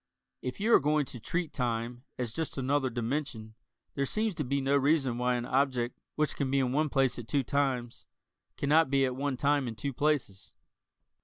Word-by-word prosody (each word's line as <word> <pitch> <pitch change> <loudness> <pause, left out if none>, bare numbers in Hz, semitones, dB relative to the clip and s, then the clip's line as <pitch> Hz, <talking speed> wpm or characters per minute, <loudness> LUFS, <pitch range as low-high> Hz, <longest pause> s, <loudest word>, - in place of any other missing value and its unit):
If 125 - -5
you 225 +3 +2
are - - +9
going 150 +1 +2
to 125 - -8
treat 170 +7 -2
time 120 0 -2
as 120 -3 -3
just 160 0 -3
another 135 0 +1
dimension, 120 -2 -3 0.4
there 140 -1 -1
seems 215 +4 0
to 155 - -3
be 140 +2 0
no 135 +1 +2
reason 135 -3 +2
why 125 0 +2
an 120 0 -2
object 130 -2 0 0.2
which 150 0 0
can 140 -2 -1
be 140 - +2
in 130 -2 +2
one 150 +3 +1
place 135 -3 +1
at 115 - -8
two 140 +4 +1
times 130 -3 -1 0.5
cannot 150 +1 +3
be 135 0 +3
at 130 -1 -2
one 135 0 -2
time 140 -1 +2
in 115 - -5
two 140 +4 -3
places. 135 -9 -1
135 Hz, 200 wpm, -30 LUFS, 125-145 Hz, 0.5 s, are